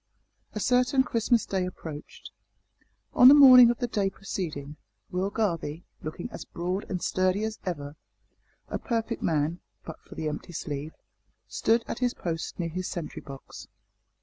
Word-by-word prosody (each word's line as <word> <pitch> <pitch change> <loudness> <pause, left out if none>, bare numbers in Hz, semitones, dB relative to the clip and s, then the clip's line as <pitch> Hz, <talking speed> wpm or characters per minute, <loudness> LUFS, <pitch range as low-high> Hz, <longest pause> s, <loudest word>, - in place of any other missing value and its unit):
A 210 - -3
certain 250 +4 +3
Christmas 235 -1 +1
day 190 -2 -1
approached. 160 -4 -8 0.8
On 250 - +8
the 275 - +10
morning 255 -4 +10
of 240 - 0
the 245 - -1
day 205 -4 0
preceding, 155 -7 -6 0.3
Will 185 +2 -1
Garvie 170 -7 -2 0.2
looking 155 +6 -5
as - - -7
broad 180 +3 -4
and 185 -4 -3
sturdy 185 +2 +1
as 220 0 -3
ever; 145 -4 -4 0.7
a - - -4
perfect 230 -1 -2
man, 160 +2 0 0.3
but 160 - -9
for - - -14
the 155 - -3
empty 150 +3 -5
sleeve 150 0 -5 0.5
stood 230 +1 +1
at - - -4
his 250 -1 0
post 165 -2 -4
near 170 -1 -1
his 180 +3 -4
sentry 170 -3 -5
box. 135 -2 -11
185 Hz, 155 wpm, -27 LUFS, 160-230 Hz, 0.8 s, the